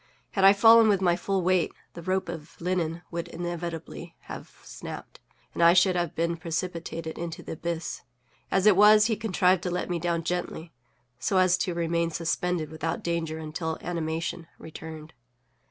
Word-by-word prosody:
Had 195 - 0
I 195 - +10
fallen 225 +2 +7
with 200 -3 +3
my 175 -2 +3
full 190 +1 -1
weight, 185 -1 +2 0.2
the 170 - -8
rope 185 +2 -1
of 165 -1 -8
linen 170 -1 -1
would 170 -1 -4
inevitably 170 -1 -6
have - - -10
snapped, - - -9 0.3
and - - -3
I 170 0 +7
should 180 +1 +4
have 175 -1 -1
been 170 +1 0
precipitated 165 -1 -4
into 170 -1 -5
the - - -7
abyss; 165 +1 -4 0.5
as 195 - +1
it 210 -3 +7
was, 210 +2 +7
he 225 -1 +1
contrived 185 -4 +2
to 180 - -2
let 180 +1 -2
me 175 - -1
down 170 0 -1
gently, 170 -1 -3 0.5
so 190 +9 0
as 185 -1 +5
to 180 -3 -1
remain 170 0 0
suspended 170 0 -1
without 160 +1 -3
danger 165 -2 -2
until 160 +1 -4
animation 165 -1 -3
returned. 160 0 -9
170 Hz, 170 wpm, -27 LUFS, 165-185 Hz, 0.5 s, I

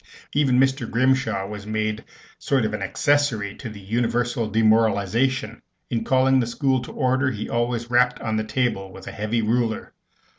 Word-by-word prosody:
Even 135 -4 +3
Mr. 135 -2 +1
Grimshaw 125 -5 +1
was 105 0 -8
made 110 0 -1
a - - -15 0.4
sort 135 -5 +1
of 105 - -2
accessory 120 -4 0
to 125 - -7
the 105 -1 -10
universal 120 +2 -1
demoralization. 110 +2 +2 0.3
In 115 -2 0
calling 130 +1 +3
the 120 - 0
school 130 +1 0
to - - -8
order, 130 0 +1
he 110 -4 -4
always 120 0 -2
rapped 125 0 +3
on 110 -1 -2
the 110 - 0
table 110 -5 -1
with - - -11
a - - -6
heavy 110 +2 -1
ruler. 115 0 -1
115 Hz, 170 wpm, -23 LUFS, 110-130 Hz, 0.4 s, Even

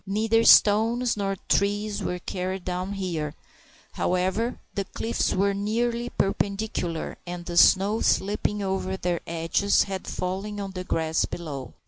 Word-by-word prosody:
Neither 220 +3 +2
stones 225 +4 +5
nor 195 -1 -1
trees 205 +1 0
were 180 -1 -2
carried 185 +1 -4
down 185 +2 -3
here, 165 -6 -3 0.6
however, 190 +7 0
for - - -21
the 200 - -2
cliffs 230 +4 -1
were 200 +1 +2
nearly 235 +4 -1
perpendicular, 195 -5 -2
and 175 0 -6
the 175 - -5
snow 200 +5 +5
slipping 205 +1 +1
over 190 0 -2
their 175 -2 -1
edges 170 +4 +2
had 190 -1 -6
fallen 195 +3 -3
on 195 -1 -4
the 185 -1 -5
grass 160 -2 0
below. 145 -6 -7
195 Hz, 140 wpm, -26 LUFS, 180-210 Hz, 0.6 s, stones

